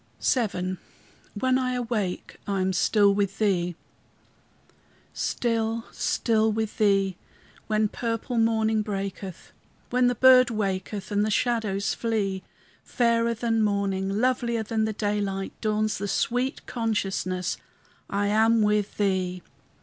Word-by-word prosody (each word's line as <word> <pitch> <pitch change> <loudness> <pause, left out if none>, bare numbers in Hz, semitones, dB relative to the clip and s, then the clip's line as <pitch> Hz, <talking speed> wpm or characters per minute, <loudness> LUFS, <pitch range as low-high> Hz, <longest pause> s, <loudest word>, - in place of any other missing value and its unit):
VII 185 -7 0 0.6
WHEN 255 +4 +2
I 255 -1 -1
AWAKE 225 -7 -3
I 200 -1 0
AM 190 0 +1
STILL 200 +2 +4
WITH 200 -1 -1
THEE 180 -5 +1 1.4
Still, 230 -1 -1
still 220 -1 +1
with 220 0 -3
Thee, 195 -3 +2 0.5
when 215 0 +2
purple 230 +2 -2
morning 220 -1 +2
breaketh, 195 -3 -5 0.4
When 250 0 +3
the 245 - +1
bird 255 -1 +7
waketh 200 -2 -3
and 205 0 +2
the 215 - 0
shadows 215 -3 0
flee; 205 -5 -1 0.4
Fairer 235 -1 +1
than 225 0 0
morning, 200 -2 0
lovelier 240 -2 +1
than 220 0 0
the 220 - -2
daylight, 200 -2 -2
Dawns 215 0 0
the 205 - -2
sweet 245 +7 -1
consciousness, 195 -6 -2 0.5
I 200 +1 0
am 220 +2 +3
with 210 -1 +1
Thee! 185 -3 0
215 Hz, 120 wpm, -26 LUFS, 195-230 Hz, 1.4 s, bird